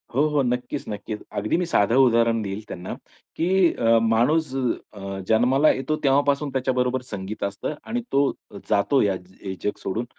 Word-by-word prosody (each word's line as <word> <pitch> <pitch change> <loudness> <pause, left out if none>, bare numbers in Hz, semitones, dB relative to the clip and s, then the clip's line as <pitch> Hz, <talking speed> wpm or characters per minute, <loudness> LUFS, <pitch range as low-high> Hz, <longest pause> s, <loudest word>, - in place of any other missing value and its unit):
हो, 135 - +3
हो, 150 -1 +2
नक्कीच-नक्कीच. 120 -4 -3 0.2
अगदी 105 +9 0
मी 180 - 0
साधं 115 - +2
उदाहरण 115 -1 +3
देईल 100 +1 -5
त्यांना, 90 +1 -6 0.4
की 165 +2 0 0.2
अ, 115 0 +3
माणूस 125 +7 +2 0.4
अ, 100 -1 -6
जन्माला 125 +7 +4
येतो 145 +3 -1
तेव्हापासून 140 +1 +2
त्याच्याबरोबर 130 -1 0
संगीत 100 +1 -5
असतं 100 +9 -3
आणि 240 +2 -3
तो 140 0 +3 0.4
जातो 135 +7 +3
ह्या 100 -2 +2 0.3
हे 95 -1 -4
जग 105 - -1
सोडून 115 +5 -2
120 Hz, 155 wpm, -24 LUFS, 105-140 Hz, 0.4 s, जन्माला